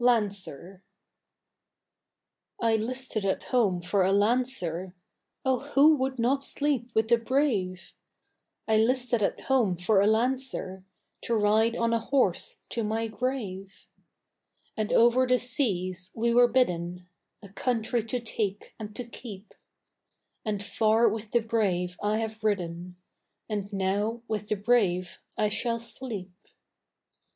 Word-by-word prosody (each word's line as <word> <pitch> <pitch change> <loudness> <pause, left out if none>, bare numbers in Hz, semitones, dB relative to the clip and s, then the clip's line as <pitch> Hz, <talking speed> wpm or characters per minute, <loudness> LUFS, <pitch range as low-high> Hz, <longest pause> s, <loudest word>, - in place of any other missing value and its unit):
LANCER 195 - 0 1.8
I 225 -1 +2
'listed 230 0 -1
at 195 -1 -1
home 200 -9 +2
for 195 +3 +1
a 190 - +2
lancer, 200 -5 +1 0.5
Oh 260 -1 +2
who 290 +3 +4
would 265 -1 -2
not 265 +4 +1
sleep 280 -5 -1
with 220 0 +2
the 235 0 +5
brave? 225 -8 -1 0.7
I 220 -1 +3
'listed 245 0 +2
at 200 - 0
home 235 -9 +1
for 195 +3 +3
a 200 - +3
lancer 230 -4 0 0.4
To 235 - 0
ride 220 +2 +3
on 230 -1 +1
a 230 - +2
horse 230 -6 0
to 230 - -2
my 220 +2 -1
grave. 210 -5 -4 0.9
And 215 -1 -2
over 240 +2 +4
the 250 0 +4
seas 185 - 0
we 235 +1 +1
were 245 0 +6
bidden 180 -7 0 0.4
A 200 - -11
country 230 +2 -1
to 245 +2 -2
take 210 -3 -3
and 210 -1 -7
to 245 - -4
keep; 220 -4 -10 0.9
And 205 -2 -2
far 220 +2 +3
with 215 0 -5
the 235 - +2
brave 185 -6 -1
I 210 +1 +1
have 220 -1 -4
ridden, 180 -4 -2 0.5
And 205 -2 -4
now 205 +4 -1
with 210 -1 -3
the 215 - +1
brave 195 -5 +1 0.2
I 210 - +2
shall 230 +3 0
sleep. 230 -5 -7
220 Hz, 135 wpm, -27 LUFS, 195-240 Hz, 1.8 s, were